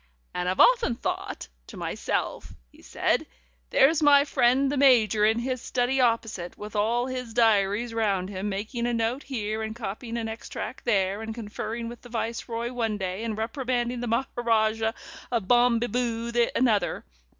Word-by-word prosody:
"And, 180 0 -1
often 245 - +4
I've 235 - -11
thought - - -4 0.2
to - - -10
myself," - - -3 0.2
he - - -19
said, - - 0 0.4
"'There's 310 +3 +4
my 285 -1 +6
friend 270 0 +3
the - - -1
Major 230 -7 +5
in 220 +1 +2
his 255 +1 -2
study 255 +1 0
opposite, 225 -7 0
with 210 0 -8
all 230 +4 +1
his 250 -3 -5
diaries 225 0 +2
round 200 -5 0
him, 200 +1 -3
making 220 +5 -3
a 240 - 0
note 230 +4 -1
here, 220 -6 -3
and 220 0 -4
copying 230 +1 -5
an 230 -1 -2
extract 225 +2 -6
there, 200 -3 +1
and 220 0 -5
conferring 230 +1 -5
with 240 0 -9
the 245 - -13
Viceroy 230 +1 -3
one 225 -4 -1
day, 190 +2 -3
and 220 -2 -3
reprimanding 240 +1 -2
the 245 - -3
Maharajah 225 -2 +1 0.4
of 230 -6 -1
Bom 240 0 +5
be 235 - 0
boo 235 -1 -2 0.2
another. 215 - +1
230 Hz, 165 wpm, -26 LUFS, 215-245 Hz, 0.4 s, my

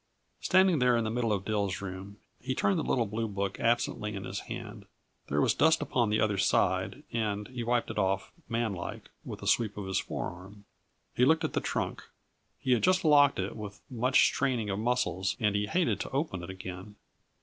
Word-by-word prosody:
Standing 185 -4 +4
there 125 -1 +4
in 115 - +1
the 110 - -2
middle 115 -1 0
of 100 -2 -1
Dill's 100 -3 -1
room, 95 +1 -7 0.2
he 130 +1 -3
turned 190 +4 +2
the - - -1
little 120 -3 +1
blue 110 +2 -2
book 100 -1 -3
absently 115 -2 0
in 95 - -5
his - - -4
hand. - - -8 0.4
There 70 - 0
was - - +3
dust 160 0 +4
upon 120 -4 0
the 105 +1 +1
other 105 -2 +1
side, - - +1
and 105 -3 -1
he 125 -1 -5
wiped 120 0 0
it - - -3
off, 95 0 0 0.2
manlike, 115 -6 -3
with - - -8
a - - -4
sweep 110 -3 +2
of 100 - -4
his 95 0 0
forearm. 95 +3 -6 0.5
He 125 - +2
looked 160 +5 +4
at - - -2
the - - 0
trunk; - - -3 0.5
he 130 - -2
had 120 - +4
just 185 -1 +3
locked 145 -2 +6
it 95 +1 -3
with 105 -2 -8
much 125 +2 +3
straining 125 -7 +1
of 95 - -2
muscles 95 -6 0
and 105 -3 +2
he 105 0 0
hated 175 - +1
to - - -4
open 135 - -2
it 85 - -8
again. 95 +2 -8
110 Hz, 205 wpm, -30 LUFS, 100-125 Hz, 0.5 s, locked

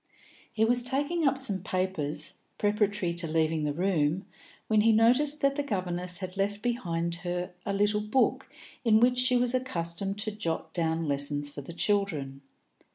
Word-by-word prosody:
He 220 -1 +2
was 245 +2 +3
taking 285 +6 0
up 275 - +2
some 205 -9 -1
papers, 160 -6 -3 0.2
preparatory 205 -3 +1
to 170 0 +2
leaving 160 -1 +1
the 150 - 0
room, 170 +1 0 0.4
when 215 -1 +3
he 225 +1 +5
noticed 250 +7 +3
that 275 0 +2
the 290 - 0
governess 180 -7 -2
had 185 0 -7
left 205 +1 -1
behind 170 -9 -1
her 175 0 -4 0.2
a 200 - 0
little 205 +1 +2
book 215 +5 +1 0.3
in 220 -3 +5
which 250 +1 +3
she 250 0 +4
was 245 0 +1
accustomed 195 -6 -2
to 215 +1 -2
jot 185 -6 -4
down 165 -1 0
lessons 145 +1 0
for 145 - -7
the 140 - -9
children. 165 -9 -1
195 Hz, 165 wpm, -28 LUFS, 170-230 Hz, 0.4 s, he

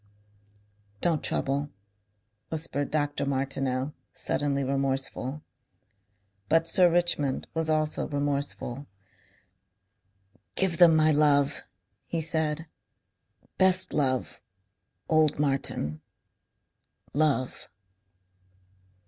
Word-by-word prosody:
"Don't 165 +1 0
trouble," 140 +2 0 0.8
whispered 150 -3 -2
Dr. 145 -1 -1
Martineau, 135 0 -2 0.2
suddenly 140 0 -1
remorseful. 135 +1 -1 1.1
But 165 +1 +3
Sir 180 -1 +5
Richmond 170 -6 +1
was 160 -1 -1
also 155 -1 0
remorseful. 140 -2 -2 1.7
"Give 185 -3 0
them 170 -2 +7
my 155 0 +5
love," 145 -2 +3 0.5
he 170 - -2
said. 160 0 0 0.9
"Best 185 -1 +4
love...Old 130 +2 -2
Martin. 135 - -1 1.1
Love." 145 -4 0
145 Hz, 70 wpm, -27 LUFS, 135-160 Hz, 1.7 s, them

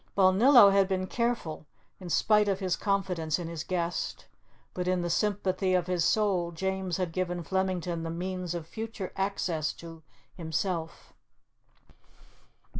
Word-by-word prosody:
Balnillo 200 +4 +7
had 195 -1 +4
been 190 -1 -1
careful, 230 -9 -2 0.3
in 180 -2 -8
spite 210 +4 +3
of 195 -1 0
his 185 -3 0
confidence 185 -6 -1
in 175 -2 -5
his 165 -2 -5
guest; 175 -1 -3 0.5
but 180 -1 -3
in 180 -1 +1
the 175 - -1
sympathy 195 -1 +1
of 180 -2 +1
his 180 -2 0
soul 190 -3 +1
James 190 0 -2
had 180 -3 -2
given 180 0 -2
Flemington 185 -2 -1
the 165 - -4
means 180 +1 -4
of 170 -2 -5
future 220 +1 -6
access 185 -5 -1
to 165 -1 -11 0.3
himself. 165 0 -4
185 Hz, 140 wpm, -29 LUFS, 170-195 Hz, 0.5 s, Balnillo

